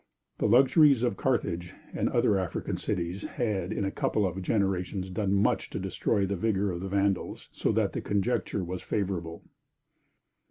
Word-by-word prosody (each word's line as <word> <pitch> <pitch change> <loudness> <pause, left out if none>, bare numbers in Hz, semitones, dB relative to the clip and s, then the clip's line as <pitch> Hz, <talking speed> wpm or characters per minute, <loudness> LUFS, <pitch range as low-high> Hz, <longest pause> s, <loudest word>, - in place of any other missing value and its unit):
The - - +2
luxuries 135 +2 +5
of 120 - +1
Carthage 90 -9 -1 0.2
and - - 0
the - - -3
other 100 -2 +3
African 90 -3 -3
cities 90 +3 -3
had 105 -6 -2
in 105 -2 -1
a 95 - -1
couple 105 +1 0
of 95 +1 -3
generations 95 -1 -1
done 95 +1 -1
much 100 +1 +2
to - - -4
destroy 100 - 0
the 100 +1 -2
vigor 100 0 0
of 85 0 -5
the 95 - -4
Vandals, 100 0 -1
so - - 0
that - - +1
the - - -3
conjuncture 100 -1 -1
was 90 +1 -5
favorable. 90 -5 -3
100 Hz, 170 wpm, -28 LUFS, 90-105 Hz, 0.2 s, luxuries